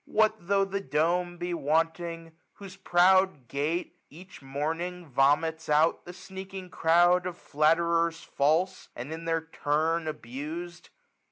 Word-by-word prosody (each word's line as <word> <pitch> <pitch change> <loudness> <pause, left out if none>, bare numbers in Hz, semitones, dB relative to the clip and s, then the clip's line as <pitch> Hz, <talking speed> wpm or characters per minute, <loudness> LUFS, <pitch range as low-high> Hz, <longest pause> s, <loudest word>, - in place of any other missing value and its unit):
What 215 -4 +1
tho* 195 0 +3
the 195 0 -3
dome 175 +2 0
be 175 0 -3
wanting, 165 +2 -1 0.2
whose 195 -2 -11
proud 185 -5 +3
gate. 160 +6 -3
Each 180 +3 -13
morning, 165 +6 -4
vomits 150 +4 +1
out 155 +2 +3
the 175 - -8
sneaking 190 0 -9
crowd 175 +2 +3
Of 180 -1 -6
flatterers 165 +2 +1
false, 160 +7 0
and 130 +6 -6
in 165 +1 -7
their 165 -1 0
turn 160 +1 -1
abus'd 155 +6 -6
165 Hz, 125 wpm, -28 LUFS, 155-180 Hz, 0.2 s, tho